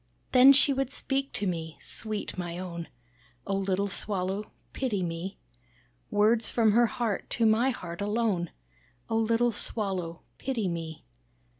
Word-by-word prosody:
"Then 260 +1 +9
she 275 +1 +5
would 270 -1 -1
speak 275 0 -1
to 205 - -1
me, 165 -3 -3
sweet 215 -2 -3
my 175 -2 -4
own! 170 -2 -5 0.6
Oh 195 - -1
little 195 0 0
Swallow 195 0 -2 0.2
pity 215 -8 -1
me, 170 +3 -4 0.7
Words 220 +2 +3
from 225 -3 +3
her 235 +2 +5
heart 225 -4 -2
to 230 - +1
my 225 +4 +4
heart 175 -7 -5
alone, 205 -5 0 0.6
Oh 225 - +2
little 230 +2 +3
Swallow 190 -6 -2 0.2
pity 235 -7 -1
me. 165 -3 -5
205 Hz, 140 wpm, -29 LUFS, 180-235 Hz, 0.7 s, Then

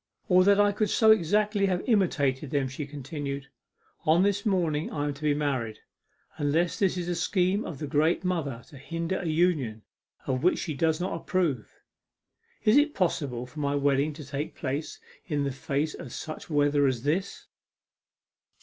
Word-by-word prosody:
'Or 185 0 +6
that 200 0 +5
I 205 0 +5
could 210 0 0
so 220 +2 +5
exactly 205 +1 +2
have 180 -2 -1
imitated 150 - +1
them,' 140 -1 0
she 140 +2 -6
continued. 140 -1 -5 0.5
'On 165 +2 +4
this 200 +1 +1
morning 165 -6 0
I 145 - -3
am 145 - -1
to 140 - -14
be 150 -1 +2
married 130 -7 -1 0.6
unless 155 +4 +1
this 190 -2 +2
is 175 -1 -3
a 175 - 0
scheme 185 +4 +1
of 155 - -6
the 150 - -4
great 155 +5 +1
Mother 150 -10 -2
to 140 - -12
hinder 165 +5 -3
a 175 - -4
union 155 -10 +1 0.4
of 130 -1 -1
which 180 - +3
she 160 - -3
does 160 +2 +1
not 180 0 -2
approve. 165 - -1 0.9
Is 215 +5 +5
it 295 +1 +3
possible 140 -9 -1
for 125 +4 -10
my 140 -1 0
wedding 140 +1 +2
to 150 -1 -9
take 140 +3 -4
place 145 +2 -4 0.3
in 150 -4 0
the 140 - -1
face 140 +3 -2
of - - -9
such 155 +2 -7
weather 145 -1 +3
as 125 -3 -1
this? 170 +7 -1
155 Hz, 175 wpm, -27 LUFS, 140-180 Hz, 0.9 s, Or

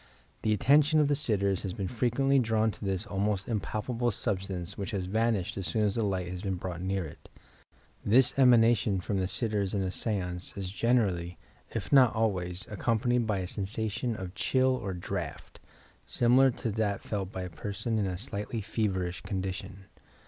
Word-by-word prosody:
The 110 - +1
attention 150 +7 +4
of 150 -1 +3
the - - +3
sitters 100 -9 +1
has 95 -3 -4
been 95 - -3
frequently 130 +5 +2
drawn 110 -2 +2
to - - -11
this 95 -2 -2
almost 100 0 -1
impalpable 115 +2 -1
sub 105 -3 -1
stance 95 -1 -5
which 100 - -4
has 95 - -3
vanished 110 -1 0
as 95 - -3
soon 110 - 0
as 105 -2 +2
the 115 - 0
light 95 -3 -1
has 90 0 -5
been 95 -2 -2
brought 90 -1 -5
near 95 -1 -1
it,... 75 - -12 0.7
This 125 +5 +5
emanation 115 -6 +4
from 95 +2 -2
the 95 - 0
sitters 105 -2 -1
in 100 - 0
a 95 - -2
seance 90 -4 -2
is 95 -2 -4
generally, 100 -7 +1 0.3
if 100 0 -4
not 130 -5 +6
always, 95 -5 0
accompanied 115 +2 +1
by 100 -3 0
a 90 - -4
sensation 110 +5 -2
of 95 -3 -6
chill 130 +4 +2
or 95 -7 -4
draft, 85 - -5 0.5
similar 125 +3 +4
to 115 -2 -3
that 105 -1 -1
felt 100 -3 -3
by 95 - -4
a 90 - -5
per 105 - -5
son 110 +2 -1
in 100 - 0
a 90 -1 -3
slightly 105 +1 -4
feverish 95 -4 -2
condition. 95 0 -5
105 Hz, 185 wpm, -29 LUFS, 95-115 Hz, 0.7 s, not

